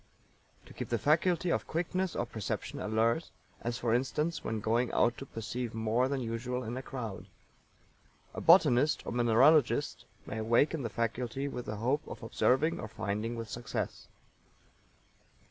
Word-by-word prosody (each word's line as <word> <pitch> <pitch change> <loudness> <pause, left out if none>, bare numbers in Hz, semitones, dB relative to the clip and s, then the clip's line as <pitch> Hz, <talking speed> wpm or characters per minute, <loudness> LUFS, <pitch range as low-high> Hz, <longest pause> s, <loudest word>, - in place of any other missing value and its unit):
To - - -14
keep - - -6
the - - +1
faculty 170 +3 +2
of - - -1
quickness 180 +2 -1
of 120 - -2
perception 110 -4 -4
alert, 115 +8 +1 0.3
as, 120 0 -2
for 115 -2 0
instance, 150 +7 0
when 110 -1 -2
going 115 +3 +1
out 120 - +3
to 135 - -8
perceive 115 +1 -5
more 115 +3 +1
than 135 -1 -2
usual 125 +2 -3
in 115 +1 -4
a 130 - -4
crowd. 120 -7 -6 1.1
A - - -5
botanist 150 -5 +5
or - - -4
mineralogist 120 +3 +3 0.2
may 110 - -5
awaken 120 +8 +2
the 115 - -3
faculty 120 +4 -2
with 125 -3 -6
the 105 - -3
hope 130 +8 0
of - - -8
observing 135 +7 +2
or 110 - -5
finding 105 +3 -3
with 115 -1 -5
success. 120 +1 -4
120 Hz, 155 wpm, -31 LUFS, 115-140 Hz, 1.1 s, botanist